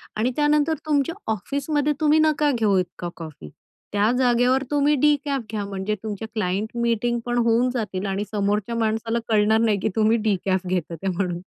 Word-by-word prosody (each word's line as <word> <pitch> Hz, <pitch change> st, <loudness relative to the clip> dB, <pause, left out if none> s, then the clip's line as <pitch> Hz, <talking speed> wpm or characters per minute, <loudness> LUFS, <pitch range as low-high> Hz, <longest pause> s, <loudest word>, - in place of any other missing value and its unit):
आणि 235 Hz, +4 st, 0 dB
त्यानंतर 300 Hz, +1 st, +2 dB
तुमच्या 300 Hz, +2 st, +1 dB, 0.2 s
ऑफिसमध्ये 285 Hz, -, -1 dB
तुम्ही 310 Hz, 0 st, +4 dB
नका 305 Hz, -1 st, +3 dB
घेऊ 215 Hz, -6 st, +2 dB
इतका 175 Hz, -1 st, -4 dB
कॉफी. 155 Hz, -, -9 dB, 0.4 s
त्या 205 Hz, +3 st, +3 dB
जागेवर 250 Hz, +1 st, +3 dB
तुम्ही 290 Hz, +1 st, +3 dB
डिकॅफ 285 Hz, -1 st, +1 dB
घ्या, 210 Hz, -2 st, -2 dB
म्हणजे 200 Hz, +1 st, -3 dB
तुमच्या 220 Hz, 0 st, -5 dB
क्लायंट 205 Hz, +1 st, -1 dB
मीटिंग 235 Hz, +1 st, 0 dB
पण 240 Hz, 0 st, -1 dB
होऊन 235 Hz, +1 st, +3 dB
जातील 205 Hz, -5 st, -3 dB
आणि 195 Hz, +1 st, -2 dB
समोरच्या 210 Hz, +2 st, -1 dB
माणसाला 225 Hz, +1 st, 0 dB
कळणार 220 Hz, 0 st, +3 dB
नाही 215 Hz, -3 st, +2 dB
की 205 Hz, -, 0 dB
तुम्ही 220 Hz, +1 st, +3 dB
डिकॅफ 190 Hz, -3 st, 0 dB
घेतात 175 Hz, -2 st, -2 dB
ते 195 Hz, -, -3 dB
म्हणून. 180 Hz, -1 st, -2 dB
225 Hz, 165 wpm, -23 LUFS, 200-265 Hz, 0.4 s, तुम्ही